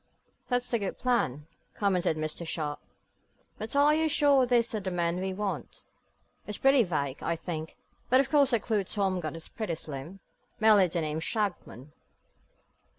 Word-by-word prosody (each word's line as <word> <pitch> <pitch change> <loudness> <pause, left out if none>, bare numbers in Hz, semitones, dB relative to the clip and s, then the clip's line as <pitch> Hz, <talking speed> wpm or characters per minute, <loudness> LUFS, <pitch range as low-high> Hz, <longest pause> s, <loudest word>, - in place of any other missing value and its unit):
"That's 245 -1 0
a 235 - +3
good 200 -2 -3
plan," 150 - 0 0.3
commented 185 -5 +1
Mr. 155 +2 -3
Sharp, 155 -3 -3 0.8
"but 220 +5 -5
are 290 +1 +5
you 315 +1 +2
sure 285 -4 +4
these 240 -1 +2
are 215 - -1
the 190 -2 -4
men 175 -1 -1
we 190 +1 -2
want? 200 +1 -5 0.6
It's 210 - -2
pretty 270 -1 +5
vague, 145 -7 -3
I 170 - -1
think, 160 -1 -6 0.3
but 255 - +5
of 275 - +2
course 285 -3 +5
the 235 -4 +2
clue 215 -2 0
Tom 190 -1 -1
got 160 -2 -5
is 165 - -7
pretty 215 -7 -4
slim; 155 +4 -7 0.4
merely 215 -4 +6
the 170 0 -2
name 155 0 -2
Shagmon." 175 - -3
195 Hz, 165 wpm, -29 LUFS, 165-240 Hz, 0.8 s, merely